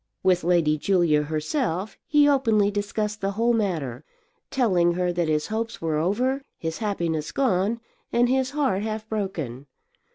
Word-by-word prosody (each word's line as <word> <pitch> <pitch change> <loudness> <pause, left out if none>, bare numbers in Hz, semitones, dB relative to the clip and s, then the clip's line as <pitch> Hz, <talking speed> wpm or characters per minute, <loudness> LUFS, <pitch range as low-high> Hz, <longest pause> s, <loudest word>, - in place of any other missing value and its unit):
With 180 -2 +3
Lady 165 -3 +2
Julia 170 -5 +3
herself 165 - -2
he 295 -1 +5
openly 225 -8 +3
discussed 210 +1 -2
the 195 0 -1
whole 230 +3 +2
matter, 160 - -1 0.5
telling 185 -10 +2
her 180 0 0
that 170 -1 0
his 150 -1 +1
hopes 225 +1 -3
were 160 -2 -1
over, 245 - 0 0.2
his 160 -1 -4
happiness 170 -8 -2
gone, 225 -3 +1 0.3
and 240 +1 +3
his 260 +1 +1
heart 275 -9 0
half 215 0 -4
broken. 160 - -4
200 Hz, 150 wpm, -25 LUFS, 165-230 Hz, 0.5 s, he